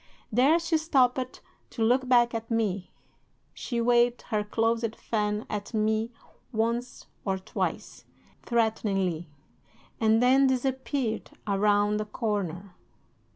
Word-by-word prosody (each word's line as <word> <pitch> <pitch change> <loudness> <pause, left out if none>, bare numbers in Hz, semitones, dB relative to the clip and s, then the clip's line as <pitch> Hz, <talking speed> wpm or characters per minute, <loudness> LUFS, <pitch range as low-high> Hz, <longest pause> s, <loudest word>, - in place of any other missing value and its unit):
There 265 +9 +4
she 330 -1 +1
stopped 255 -5 +1 0.3
to 225 - -2
look 250 +3 +2
back 240 -1 +4
at 225 0 -4
me. 205 -5 -1 0.6
She 240 -3 -4
waved 240 +1 +3
her 210 -1 +1
closed 225 +1 0
fan 210 -1 -2
at 210 +2 -5
me 220 +1 +1 0.4
once 235 +2 -2 0.2
or 190 -1 -1
twice, 190 - -4 0.4
threateningly, 195 -8 0 0.7
and 220 0 +4
then 265 +3 +5
disappeared 260 -2 -1 0.2
around 205 +1 +2
a - - -3
corner. 200 -5 -3
225 Hz, 110 wpm, -27 LUFS, 210-245 Hz, 0.7 s, then